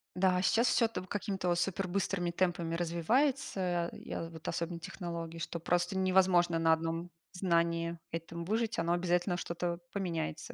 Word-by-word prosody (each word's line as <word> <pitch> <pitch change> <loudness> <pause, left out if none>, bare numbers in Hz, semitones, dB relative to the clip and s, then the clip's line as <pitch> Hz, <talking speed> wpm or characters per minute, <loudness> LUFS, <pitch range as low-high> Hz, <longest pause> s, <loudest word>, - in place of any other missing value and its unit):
Да, 180 0 +3
сейчас 230 +5 +3
всё 230 - +4
там 185 -5 -5
какими-то 195 -2 -2
вот 175 0 +2
супер 195 0 0
быстрыми 180 -2 0
темпами 175 -2 0
развивается, 175 - +1
я 165 - -6
вот 160 -1 -10
особенно 170 0 -2
технологии, 170 -2 -5
что 170 +1 -4
просто 175 +2 +1
невозможно 185 -2 +4
на 165 0 +4
одном 165 +2 0 0.2
знании 170 -2 +1 0.2
этом 165 +1 -5
выжить. 225 0 0
Оно 170 +1 +2
обязательно, 175 +1 +1
что-то 170 0 -2
поменяется 170 - -3
175 Hz, 150 wpm, -32 LUFS, 170-190 Hz, 0.2 s, всё